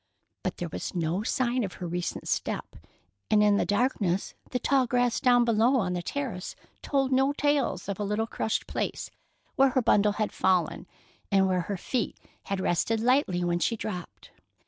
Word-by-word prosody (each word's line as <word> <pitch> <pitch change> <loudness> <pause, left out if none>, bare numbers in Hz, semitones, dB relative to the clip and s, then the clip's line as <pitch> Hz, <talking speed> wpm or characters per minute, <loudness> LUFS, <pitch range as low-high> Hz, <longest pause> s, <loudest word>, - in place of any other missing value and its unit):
But - - -3
there 175 - -4
was 160 - -5
no 170 +2 0
sign 245 +2 0
of 190 - -4
her 180 - -7
recent 175 +1 -3
step, - - -2 0.5
and 210 -1 +5
in 205 -1 +4
the - - 0
darkness 205 -4 0 0.2
the 250 - -1
tall 260 0 +2
grass 245 -1 +1
down 245 -1 +4
below 230 +3 +3
on 190 -8 +1
the 175 - -2
terrace 220 -3 -4 0.3
told 270 -2 0
no 265 +2 +3
tales 290 -3 0
of 200 -1 -4
a - - -1
little 210 +2 0
crushed 220 -1 -2
place - - -3 0.5
where 270 0 +6
her 260 0 +1
bundle 210 -2 +4
had 215 0 -1
fallen 180 -1 +1 0.4
and 195 -1 +4
where 185 -1 +1
her 195 +3 -4
feet 240 +6 -2 0.3
had 195 -1 -2
rested 190 +5 +1
lightly 230 -7 +2
when 175 0 0
she 230 - +1
dropped. 180 -5 -7
210 Hz, 180 wpm, -28 LUFS, 185-250 Hz, 0.5 s, where